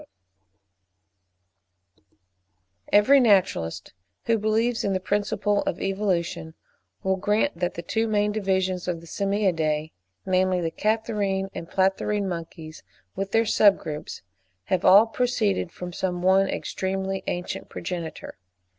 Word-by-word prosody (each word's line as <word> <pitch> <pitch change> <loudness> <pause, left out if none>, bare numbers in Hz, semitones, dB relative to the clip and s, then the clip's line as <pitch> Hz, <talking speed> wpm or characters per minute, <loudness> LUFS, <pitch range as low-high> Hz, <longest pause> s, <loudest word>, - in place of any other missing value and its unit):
Every 210 +7 +6
naturalist, 195 - +1 0.3
who 230 -1 +2
believes 225 +3 +1
in 200 - 0
the 185 - 0
principle 205 +1 0
of 175 - -2
evolution, 185 -5 -2 0.5
will 190 0 +1
grant 210 +4 0
that 175 0 -1
the 170 - -6
two 225 +6 -1
main 210 -1 +1
divisions 190 -3 -1
of 175 -2 -2
the 170 - -14
Simiadae, 165 -6 0 0.3
namely 185 -1 +2
the 165 -2 -2
Catarrhine 205 -1 -1
and 165 - -7
Platyrrhine 195 +2 0
monkeys, 165 -2 -7 0.3
with 195 +1 -3
their 225 0 +3
sub 205 -1 +5
groups, 150 -1 -7 0.4
have 185 - -1
all 200 +4 +8
proceeded 225 -6 0
from 180 0 -8
some 180 -1 -3
one 190 +1 +4
extremely 190 0 -3
ancient 175 0 -4
progenitor. 170 - -6
190 Hz, 120 wpm, -25 LUFS, 180-210 Hz, 0.5 s, all